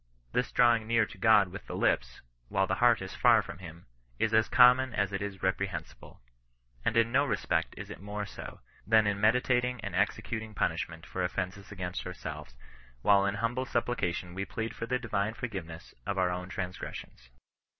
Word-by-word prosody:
This 125 - 0
drawing 120 -2 +4
near 115 -1 +3
to - - -13
God 105 -4 +5
with 95 - -9
the - - -5
lips, 60 -1 0 0.3
while - - +2
the - - -1
heart - - +5
is - - -7
far - - +5
from - - -9
him, 85 -1 -11 0.3
is 110 0 0
as 110 0 +4
common 125 0 +6
as 100 0 0
it 95 - -2
is 100 -2 -5
reprehensible. 95 -7 -3 0.6
And 115 - +1
in 115 0 +3
no 140 +3 +4
respect 110 -8 -1
is - - -7
it - - -9
more 105 +1 -4
so, - - -9 0.3
than 110 0 +5
in 100 -1 0
meditating 125 +2 +2
and - - -5
executing 110 -1 -1
punishment 80 -2 -2
for 95 - -3
offences 95 +2 -4
against 90 -2 -5
ourselves, 65 - -7 0.5
whilst 100 -1 +5
in 100 - -3
humble 115 +4 -1
supplication 95 -8 -1
we 95 +2 -3
plead 110 +4 -4
for 115 - -5
the 125 - +1
divine 110 -2 -2
forgiveness 95 -10 -6
of 100 - -1
our 90 -1 +2
own 90 +1 -4
transgres 90 -1 -5
sions. - - -11
105 Hz, 185 wpm, -30 LUFS, 95-115 Hz, 0.6 s, common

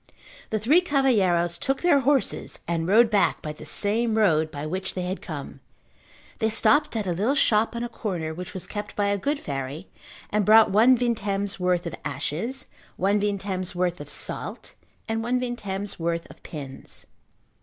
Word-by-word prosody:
The 220 - 0
three 275 - +4
cavalheiros 195 - +2
took 270 +3 -1
their 345 -5 +5
horses 275 0 0
and 165 -1 -1
rode 225 +4 +5
back 205 - +3
by 150 - -4
the 155 - -12
same 220 +6 +1
road 160 -7 +3
by 145 0 -6
which 185 +5 -3
they 180 - -2
had 185 +2 -4
come. - - -7 0.8
They 220 - +2
stopped 290 +6 +3
at 215 -2 -1
a 180 - -1
little 210 +11 +1
shop 225 -4 +2
on 235 - -2
a - - -2
corner 180 -9 -4
which 180 +2 -7
was 185 - -3
kept 205 0 -6
by 205 -1 +1
a 200 - +1
good 285 +7 -1
fairy 140 - -5 0.4
and 210 0 +2
bought 220 +1 +6
one 235 +6 +6
vintem's 205 -4 -1
worth 180 -1 +1
of 170 - -4
ashes, 180 - -3 0.3
one 200 +3 +2
vintem's 195 -3 -2
worth 175 -2 -1
of 145 - -9
salt - - -4 0.3
and 225 0 -1
one 245 +2 0
vintem's 205 -6 -4
worth 170 0 -2
of - - -17
pins. 140 -4 -9
200 Hz, 175 wpm, -25 LUFS, 175-230 Hz, 0.8 s, bought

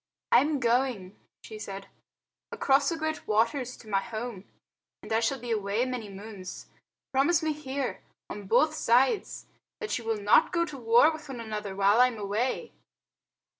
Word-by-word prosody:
"I - - +8
am 295 0 0
going," 235 -6 0 0.3
she 215 -1 -9
said, 195 -1 -7 0.7
"across 275 +1 +2
the 335 - -2
Great 315 0 -3
Waters 240 +4 0
to 225 - -16
my 200 -2 +1
home, 225 -3 -6 0.6
and - - -4
I 225 - +4
shall 255 +4 0
be 240 0 -5
away 210 +2 0
many 250 -5 -4
moons. 195 -1 -9 0.5
Promise 290 +5 +3
me 310 -1 +1
here, 275 -3 -4 0.3
on 205 -2 -8
both 305 +9 +3
sides, 265 - +1 0.3
that 435 - -2
you - - -10
will 225 -1 -1
not 205 +9 +4
go 340 -1 +1
to 305 -4 -8
war 235 +6 +5
with 310 -2 -9
one 255 -3 -6
another 210 -3 -5
while 200 +4 +4
I 250 - +7
am 245 -3 -5
away." 215 - -2
235 Hz, 170 wpm, -28 LUFS, 210-275 Hz, 0.7 s, I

